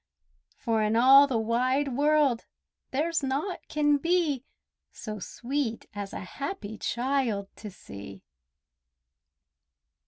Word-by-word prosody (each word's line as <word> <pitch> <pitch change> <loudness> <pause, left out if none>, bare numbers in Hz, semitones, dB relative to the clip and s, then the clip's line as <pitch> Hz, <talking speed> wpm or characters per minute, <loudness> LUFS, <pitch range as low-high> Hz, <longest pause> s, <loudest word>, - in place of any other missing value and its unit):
For 225 -1 0
in 215 +1 +1
all 270 +4 +8
the 255 -4 0
wide 255 +5 +1
world 290 -4 +2 0.4
there's 320 +5 0
naught 285 +7 -2
can 295 -1 +3
be 325 -4 +1 0.5
So 215 -2 -7
sweet 245 +3 -3
as 200 -1 -5
a - - -6
happy 220 - -6
child 240 -6 -1
to 210 - -8
see! 100 - -11
260 Hz, 105 wpm, -28 LUFS, 220-290 Hz, 0.5 s, all